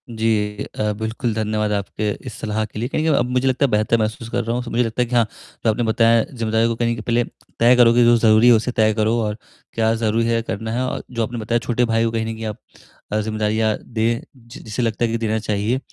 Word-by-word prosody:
जी 110 -2 -1 0.2
अ, 105 0 +1
बिल्कुल। 110 +1 -2
धन्यवाद 105 -1 -1
आपके 105 +1 -2 0.2
इस - - -6
सलाह 110 0 -2
के 105 - -8
लिए, 120 - -1
कहीं 155 - -1
न - - -1
कहीं 155 - +3
अब 120 - 0
मुझे 125 +1 +1
लगता 130 +2 +2
है - - 0
बेहतर 110 +2 +2
महसूस 110 +1 -3
कर 120 +1 -1
रहा 115 +1 -2
हूँ, 125 - -2
तो 120 - -8
मुझे 120 +1 +2
लगता 115 +1 -2
है - - +3
कि 125 - -2
हाँ, 120 -2 +4 0.4
जो - - +4
आपने 120 +3 -1
बताया 115 0 +3
जिम्मेदारियों 115 -2 0
को 115 - -1
कहीं 115 0 0
न - - +1
कहीं 110 - -6
पहले 120 +1 +1 0.4
तय 120 +2 +6
करोगे 120 0 +5
जो 120 0 +6
ज़रूरी 110 +1 +5
है, 120 - +8
उसे 115 +2 +1
तय 110 -2 +2
करो 110 +1 +1
और 105 0 -3 0.4
क्या 110 0 +2
ज़रूरी 115 0 0
है 115 0 +1
करना 110 0 -4
है 120 - -1
और - - -4
जो 115 -2 -1
आपने 120 +2 -4
बताया 115 +2 0
छोटे 120 0 +1
भाई 115 -1 +1
को - - +1
अ, - - -9
कहीं 110 -1 -1
न 115 - -3
कहीं 110 0 -7
आप 105 -1 -4 0.5
अ, 105 - +1
जिम्मेदारियाँ 110 0 0
दें, 115 0 -1
जि 115 -2 -13
जिसे 110 +3 -4
लगता 115 0 0
है 115 - -2
कि 115 - 0
देना 110 -1 -1
चाहिए। 105 +3 -1
115 Hz, 270 wpm, -21 LUFS, 110-120 Hz, 0.5 s, है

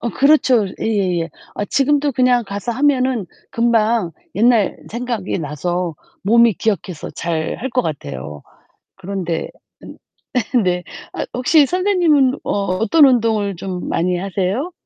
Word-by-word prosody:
어 235 - -2
그렇죠. 260 -6 +4
예예예. 185 -6 0 0.3
아 205 - -1
지금도 285 +3 +1
그냥 250 -1 +2
가서 200 +4 -4
하면은 255 -5 +1 0.2
금방 230 -5 +1 0.2
옛날 230 -1 +3
생각이 235 -5 -3
나서 170 +4 -3 0.3
몸이 230 +3 +5
기억해서 190 -6 -3
잘할 170 +9 -3
것 250 0 +1
같아요. 75 - -6 0.5
그런데 190 -3 -4 1.2
네. 180 0 0 0.3
아 - - -3
혹시 280 +4 +4
선생님은 345 -8 +2
어 - - -6 0.3
어떤 230 - +5
운동을 220 -5 +1
좀 185 -1 -5
많이 180 +2 0
하세요? 195 - -2
220 Hz, 250 characters per minute, -19 LUFS, 180-255 Hz, 1.2 s, 몸이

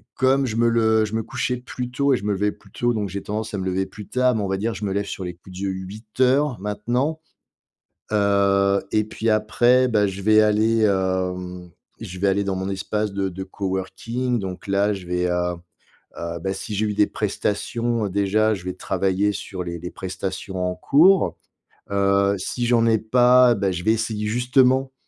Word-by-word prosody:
comme 135 0 +2
je 110 - -3
me 115 +1 +3
le 110 -1 +3
je 105 - -8
me 115 - 0
couchais 125 +2 -2
plus 125 0 -6
tôt 140 +2 +2
et - - -1
je - - -9
me 105 - 0
levais 105 +1 0
plus 100 - -19
tôt, 120 +2 0
donc 105 -2 -2
j'ai 100 +2 -5
tendance 105 +2 -4
à 100 - -2
me 95 - -3
lever 95 +1 0
plus 105 +1 -11
tard, 125 0 +2
mais 110 - -1
on 100 - -2
va 95 0 -1
dire, 110 +4 -2
je 100 +1 -5
me 100 - -2
lève 100 +1 -1
sur 100 - -6
les 90 -1 -5
coups 90 +1 -15
de 100 - -1
8:00 110 +8 0
maintenant, 120 +10 -1 0.9
heu, 100 -1 +3
et 110 0 +2
puis 110 +1 -2
après, 120 +4 +3
bah, 105 -3 +2
je 95 0 -5
vais 110 +2 +5
aller, 110 +1 +3
hem, 90 -2 -1 0.3
je 90 - -7
vais 100 +2 +2
aller 100 +1 +1
dans 95 -1 -2
mon 95 +1 -3
espace 105 +2 -2
de 100 -1 -1
de 95 +1 -7
coworking 100 +6 -3
donc 95 -3 -6
là, 100 +1 +2
je 95 -2 -9
vais, 90 0 0
heu, 90 0 0 0.6
heu, 85 0 -5
beh, 95 +3 -2
si 105 +2 -6
j'ai 105 +2 0
eu 105 - -2
des 105 - +3
prestations, 110 +2 -2
déjà 100 +3 +2
je 95 -3 -8
vais 90 - -3
travailler 95 +2 0
sur 95 -1 -6
les 85 0 -5
les 90 +2 -7
prestations 95 0 -5
en 90 - -2
cours. 170 - +4 0.5
Heu, 100 0 +2
si 120 +6 -3
j'en 115 -1 +3
ai 115 -1 +4
pas, 125 +2 +5
beh, 100 -3 0
je 90 0 -5
vais 110 - +4
essayer 110 -1 -2
justement 130 +3 +2
105 Hz, 205 wpm, -22 LUFS, 95-115 Hz, 0.9 s, vais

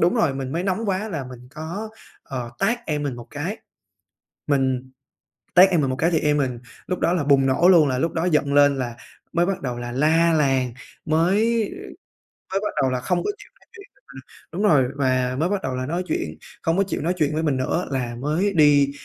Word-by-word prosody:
đúng 175 - +3
rồi, 145 -5 +2
mình 135 -1 -4
mới 170 +3 -1
nóng 195 +4 -1
quá 195 +3 -1
là 155 -9 -4
mình 125 -1 -11
có, 170 +8 -5 0.3
ờ, 125 -3 -6
tát 235 +5 +1
em 150 -2 -1
mình 140 -4 -3
một 120 - -10
cái, 165 +9 -4 0.9
mình 130 -2 0 0.6
tát 185 +2 +8
em 175 -4 +2
mình 135 -3 0
một 130 - -2
cái 165 +5 +1
thì 165 - +2
em 150 0 +2
mình 130 -4 -1 0.3
lúc 180 - -2
đó 170 - +1
là 175 -5 0
bùng 140 -1 +4
nổ 135 +7 +3
luôn, 165 -6 +6
là 130 -1 -1
lúc 165 +5 0
đó 165 - -1
giận 150 -5 +1
lên 145 -1 +5
là 120 -2 -3 0.4
mới 175 +1 +2
bắt 195 0 -2
đầu 125 -3 -3
là 120 0 -5
la 160 +5 +3
làng, 135 -5 +1 0.3
mới 165 +5 +2 1.2
mới 195 - +1
bắt 210 - -3
đầu 130 - +2
là 125 - -1
không 175 +7 0
có - - 0
chịu 415 - -15
nói - - -27
chuyện 400 -1 -12
với - - -31
mình 135 -1 -11 0.3
đúng 185 +5 -3
rồi 150 -11 +5
và 130 -2 +1
mới 160 +4 +1
bắt 200 0 -1
đầu 130 -1 -3
là 130 0 -3
nói 170 +5 -2
chuyện - - -3 0.2
không 165 +1 +1
có - - +5
chịu 195 - -4
nói 175 +4 0
chuyện 150 -3 0
với 160 - 0
mình 150 -4 +1
nữa, 130 +7 -1
là 125 -3 -2
mới 155 +10 0
đi 145 -3 +5
150 Hz, 235 wpm, -23 LUFS, 130-175 Hz, 1.2 s, tát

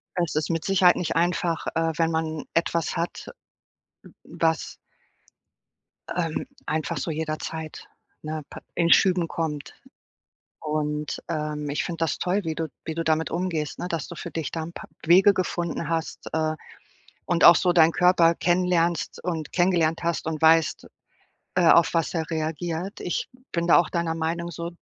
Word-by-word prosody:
Es 170 -4 -1
ist 155 - 0
mit 165 -1 -1
Sicherheit 185 -2 +5
nicht 170 - -2
einfach, 170 0 0
äh, 165 0 +1
wenn 165 -1 +2
man 160 -1 -2
etwas 170 -1 0
hat, 170 +1 -4 0.8
w - - -15
was 160 -1 -1 1.3
ähm, 165 +1 -2 0.2
einfach 155 0 -2
so 150 - -3
jederzeit, 155 0 -5 0.4
ne, 155 0 -4
pa - - -9
in 170 -1 +1
Schüben 180 -3 +4
kommt. 150 -3 -4 0.9
Und, 150 -1 -2
ähm, 150 -2 -3
ich 145 - -1
finde 165 -2 -5
das 160 - -1
toll, 190 +3 0
wie 160 -1 -2
du 165 -1 -2 0.2
wie 160 - -3
du 165 - -1
damit 160 0 +1
umgehst, 165 -4 -2
ne, 180 - -3
dass 165 -4 -3
du 170 - -9
für - - -7
dich 160 -3 -4
da 165 - -3
'n 170 +2 -8
paar - - -10 0.2
Wege 190 +4 +6
gefunden 175 -3 -2
hast, 165 -1 -3
äh, 155 0 0 0.7
und 175 -1 +1
auch 170 - +10
so 180 - +2
deinen 165 -1 +6
Körper 175 -2 +4
kennenlernst 175 -2 +1
und 165 -3 -3
kennengelernt 175 -2 +2
hast 170 -2 -1
und 160 -1 -3
weißt, 160 0 +4 0.7
äh, 175 -2 +4
auf 170 0 +6
was 165 -2 0
er 160 -2 -2
reagiert. 165 +4 -3
Ich 175 - -3 0.2
bin 170 0 -1
da - - +7
auch 175 - +2
deiner 170 -1 -1
Meinung 170 +1 -2
so, 170 +1 -5
165 Hz, 165 wpm, -25 LUFS, 160-175 Hz, 1.3 s, auch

